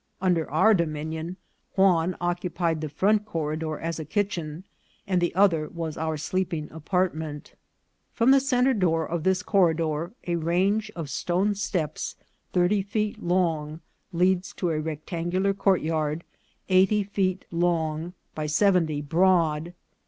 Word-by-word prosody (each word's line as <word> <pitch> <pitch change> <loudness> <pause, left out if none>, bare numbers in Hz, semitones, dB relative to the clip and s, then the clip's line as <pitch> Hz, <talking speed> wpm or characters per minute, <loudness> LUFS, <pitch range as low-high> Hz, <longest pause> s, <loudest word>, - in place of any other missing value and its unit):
Under 175 -4 +1
our 185 +9 +5
dominion 160 0 -2 0.4
Juan 185 -3 +3
occupied 175 -2 -1
the 155 - -3
front 205 +8 +2
corridor 155 -4 -3
as 165 0 -3
a - - -3
kitchen, 175 -4 -2 0.4
and 185 -3 +1
the 175 -1 0
other 175 -6 +3
was 165 -2 -5
our 160 0 -2
sleeping 170 -1 -2
apartment. 160 -2 -2 0.6
From 235 +3 +3
the 275 - +7
centre 265 -1 +2
door 165 -7 +1
of 170 0 -2
this 190 0 +1
corridor 165 -3 +1
a 175 -1 0
range 190 +6 +1
of 165 -4 -4
stone 185 +4 0
steps 180 -6 -3 0.4
thirty 185 +3 +2
feet 210 +2 -2
long 165 -4 0 0.3
leads 180 +2 +1
to 175 -3 -1
a 155 - 0
rectangular 170 +5 -1
courtyard, 160 -5 0 0.4
eighty 195 +2 +4
feet 190 -2 -1
long 170 -1 0 0.2
by 155 -1 -3
seventy 160 -3 +2
broad. 165 0 +2
175 Hz, 130 wpm, -26 LUFS, 160-190 Hz, 0.6 s, the